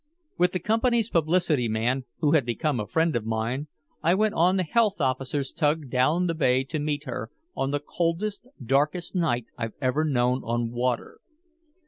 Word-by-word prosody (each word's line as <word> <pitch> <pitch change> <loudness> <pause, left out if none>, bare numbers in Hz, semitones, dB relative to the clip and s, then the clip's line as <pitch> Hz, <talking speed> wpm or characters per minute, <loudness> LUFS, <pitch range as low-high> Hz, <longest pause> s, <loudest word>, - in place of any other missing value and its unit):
With 180 0 +2
the 185 - 0
company's 225 +3 +1
publicity 160 -5 +2
man, 120 +4 0 0.2
who 150 - +3
had 155 -3 +4
become 125 +3 -1
a 105 - -3
friend 160 +7 +1
of 120 - 0
mine, 115 +6 -2 0.3
I 170 +3 +3
went 215 +1 +2
on 180 +1 +3
the 185 - +2
health 205 +2 +1
officer's 135 0 -1
tug 150 -3 0
down 150 +8 +2
the 170 - 0
Bay 130 -5 +2
to 150 +3 -4
meet 145 0 -2
her, 120 -5 -5 0.3
on 135 - -1
the 145 +1 0
coldest, 175 - -2 0.2
darkest 150 +7 +1
night 155 - 0
I've 115 -2 -3
ever 130 +3 +1
known 125 -3 +1
on 120 0 -1
water. 120 0 -2
145 Hz, 175 wpm, -26 LUFS, 125-170 Hz, 0.3 s, had